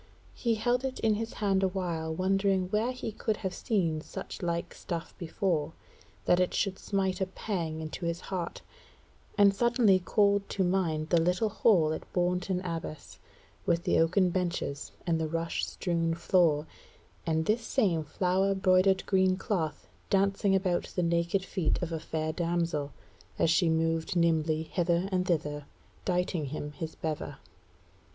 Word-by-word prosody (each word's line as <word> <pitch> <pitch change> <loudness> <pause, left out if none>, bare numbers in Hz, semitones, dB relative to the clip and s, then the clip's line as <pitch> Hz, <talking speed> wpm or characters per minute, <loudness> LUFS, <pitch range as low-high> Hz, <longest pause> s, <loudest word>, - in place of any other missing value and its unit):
He 230 -2 0
held 245 +3 +1
it 265 -1 -3
in 220 -1 +3
his 225 +2 -3
hand 195 -2 +1
a 190 - +3
while 175 -4 -2
wondering 190 +1 +1
where 215 +5 +1
he 250 -3 -5
could 215 0 -2
have 185 - -1
seen 170 -8 0
such - - -7
like 170 -1 -2
stuff 170 -1 -5
before, 170 -2 -1 0.5
that 175 - +4
it 180 - +1
should 195 -2 0
smite 190 -2 -1
a 190 - +1
pang 170 -5 -3
into 160 +2 -4
his 170 0 -2
heart, 180 -3 -4 0.7
and 200 -1 +6
suddenly 230 -3 +4
called 200 +1 +2
to 195 - 0
mind 170 -4 0
the 170 -2 +4
little 180 +6 +1
hall 185 -7 +3
at - - -7
Bourton 180 +1 0
Abbas 165 -4 -6 0.5
with 170 0 +2
the - - +2
oaken 180 +3 +3
benches 175 -6 -2
and 165 -2 +1
the 160 - 0
rush 165 +1 -2
strewn 165 -2 -1
floor, 170 -3 +3 0.6
and 160 0 +1
this 220 +5 +2
same 195 -9 +1
flower 185 +5 +1
broidered 190 0 +3
green 185 -1 +3
cloth 170 -7 -2 0.2
dancing 195 0 +2
about 185 -2 +1
the 180 - +1
naked 170 +3 +1
feet 180 -6 0
of 175 -1 -3
a 165 - -2
fair 155 0 -3
damsel, 165 -4 -1 0.5
as 165 - +3
she 165 0 +3
moved 165 +2 0
nimbly 160 -2 +2
hither 175 +2 0
and 185 -1 0
thither 150 -4 -1 0.4
dighting 180 -3 0
him 150 +1 -5
his 160 +1 -6
bever. 155 -2 -4
180 Hz, 160 wpm, -29 LUFS, 165-195 Hz, 0.7 s, and